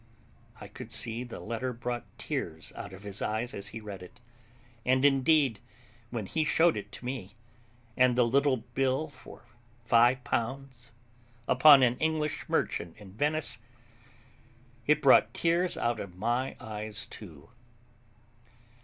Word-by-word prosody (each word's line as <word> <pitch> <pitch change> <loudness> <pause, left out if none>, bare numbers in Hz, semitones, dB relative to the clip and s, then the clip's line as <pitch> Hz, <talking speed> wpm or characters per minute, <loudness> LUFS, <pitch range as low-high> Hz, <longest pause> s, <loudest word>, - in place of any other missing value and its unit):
I - - -9
could - - -10
see 115 +2 +1
the 120 - -8
letter 120 +3 -3
brought 120 0 -4
tears - - -5
out - - -7
of 95 +1 -11
his 100 0 -5
eyes 110 +3 -2
as 100 0 -5
he 115 - -6
read 105 -3 -8
it; 90 +6 -13 0.6
and, 130 +2 +3
indeed, 135 -4 +3 0.5
when 115 -4 -4
he 160 +10 0
showed 160 +2 +3
it 100 - -6
to - - -9
me, 115 -6 -5 0.6
and 125 -1 +4
the 125 -1 +4
little 135 +2 +3
bill 130 +6 -1
for 145 - -14 0.4
five 120 +2 +4
pounds, 125 0 -4 0.6
upon 140 +1 +8
an 125 0 +2
English 155 -1 -1
merchant 85 +3 -1
in 105 -3 -13
Venice, 145 -1 0 1.3
it 150 0 +3
brought 115 -4 +6
tears 170 +2 +1
out 120 -2 0
of 90 -3 -7
my 120 +6 -1
eyes 105 -1 -5
too. 85 - -11
120 Hz, 140 wpm, -29 LUFS, 110-135 Hz, 1.3 s, upon